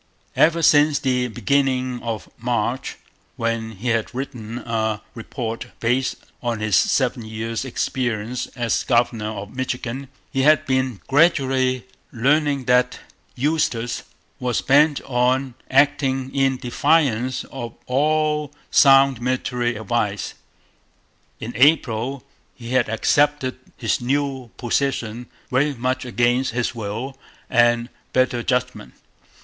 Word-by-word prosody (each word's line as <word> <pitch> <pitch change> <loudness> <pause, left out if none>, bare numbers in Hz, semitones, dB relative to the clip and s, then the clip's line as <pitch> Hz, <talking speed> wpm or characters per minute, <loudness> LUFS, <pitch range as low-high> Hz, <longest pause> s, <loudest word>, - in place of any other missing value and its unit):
Ever 165 +1 +3
since 150 -1 +5
the 125 -2 0
beginning 130 0 0
of 115 -2 -4
March, 120 +1 -2 0.4
when 115 -1 -2
he 110 +5 -4
had 115 +1 -1
written 120 -4 -5
a 110 -3 -2
report 115 -1 -5
based 125 +3 +1 0.3
on 120 -3 -2
his 105 -3 +1
seven 125 - +2
years' 110 +2 -4
experience 125 -2 -2
as 120 -2 0
governor 115 -3 +1
of 105 0 -7
Michigan, 130 +1 -3 0.2
he 135 - 0
had 150 +2 +4
been 130 -5 0
gradually 130 -4 +2 0.3
learning 140 +2 +1
that 125 0 +3 0.4
Eustis 130 -4 0 0.4
was 125 -2 0
bent 145 +1 +4
on 130 +1 0 0.2
acting 135 -1 +2
in 135 -1 +2
defiance 130 -1 +1
of 120 -3 -6
all 150 +2 +1 0.2
sound 135 -3 +6
military 125 -1 -1
advice. 105 -2 -2 1.1
In 115 +2 -6
April 130 -1 +2 0.3
he 115 -1 -9
had 130 -3 +2
accepted 135 +3 +1 0.2
his 115 -1 0
new 135 -1 -1
position 120 -2 -1 0.2
very 140 +3 +2
much 130 +2 -2
against 120 +2 +1
his 120 -1 -1
will 115 +4 -5 0.4
and 120 0 +3 0.2
better 130 -1 +2
judgment. 125 -3 -2
125 Hz, 115 wpm, -22 LUFS, 115-135 Hz, 1.1 s, sound